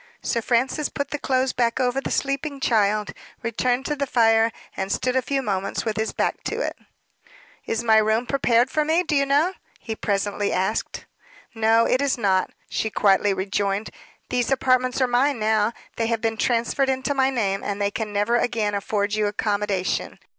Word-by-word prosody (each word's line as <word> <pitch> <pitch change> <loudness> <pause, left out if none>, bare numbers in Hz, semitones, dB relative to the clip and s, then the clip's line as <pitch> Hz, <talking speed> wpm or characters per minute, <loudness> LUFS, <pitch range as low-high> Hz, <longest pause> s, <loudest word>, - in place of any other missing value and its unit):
Sir 230 - 0
Francis 255 +6 0
put 280 - -4
the 295 - -3
clothes 260 -1 0
back 235 0 0
over 255 +1 +1
the - - -4
sleeping 275 +1 -2
child, 210 -4 +1 0.3
returned 245 +3 0
to 295 - -1
the 280 -1 -2
fire, 225 -2 +3 0.2
and 190 +1 -3
stood 255 0 0
a 260 - +3
few 270 +2 -2
moments 195 -2 -2
with 220 -2 -1
his 220 +1 -1
back - - -2
to - - -2
it. - - -2 0.9
"Is 225 +1 -1
my 220 -2 +5
room 220 +2 +2
prepared 245 -2 +2
for 305 - +1
me, 320 +4 +2
do 310 - -1
you 275 0 +2
know?" 295 +7 +2 0.2
he 225 - -6
presently 205 0 -1
asked. 190 +4 -2 0.5
"No, 225 0 +3
it 255 - +2
is 280 -2 +1
not," 190 -4 +1 0.2
she 220 - -2
quietly 205 -1 +3
rejoined. 195 +2 -1 0.4
"These 245 -1 0
apartments 255 -1 +2
are 255 - +4
mine 250 +3 +2
now; 215 0 +2 0.3
they 230 - 0
have 230 -1 0
been 225 0 -1
transferred 240 +4 +1
into 265 +2 0
my 265 -1 +2
name, 200 -7 -1
and 205 0 -3
they 200 0 0
can 215 0 -4
never 205 +4 +1
again 225 -4 0
afford 205 0 -1
you 215 -1 +1
accommodation. 205 -2 -1
230 Hz, 185 wpm, -23 LUFS, 210-260 Hz, 0.9 s, my